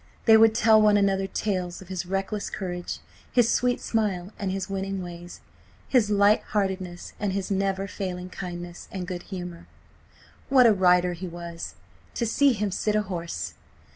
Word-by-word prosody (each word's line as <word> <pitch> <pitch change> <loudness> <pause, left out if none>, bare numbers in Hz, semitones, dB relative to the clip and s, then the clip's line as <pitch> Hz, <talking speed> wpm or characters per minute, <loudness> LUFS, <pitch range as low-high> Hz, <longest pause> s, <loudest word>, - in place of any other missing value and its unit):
They 225 - +8
would 220 0 +6
tell 220 -1 +6
one 210 -1 +5
another 195 -1 +2
tales 185 -4 -2
of 190 - -13
his 180 -2 -4
reckless 195 +2 -2
courage; 180 -2 -4 0.3
his 240 -2 +4
sweet 250 0 +1
smile 200 -4 -1
and 195 -2 -1
his 190 0 -3
winning 195 -1 -3
ways; 175 0 -9 0.5
his 240 -6 +3
light 205 +1 +4
heartedness 190 -4 -3
and 205 -2 -1
his 195 0 -3
never 195 0 0
failing 185 -2 -5
kindness 175 -2 -7
and 185 -2 -4
good 180 -1 -5
humour. 180 -3 -7 0.8
What 260 -2 +6
a 225 - +7
rider 180 -2 +4
he 180 +2 -6
was! 170 -1 -7 0.4
To 235 - 0
see 275 +4 +4
him 210 -2 -1
sit 210 +3 0
his 210 -1 +1
horse! 170 - -4
195 Hz, 170 wpm, -26 LUFS, 180-210 Hz, 0.8 s, They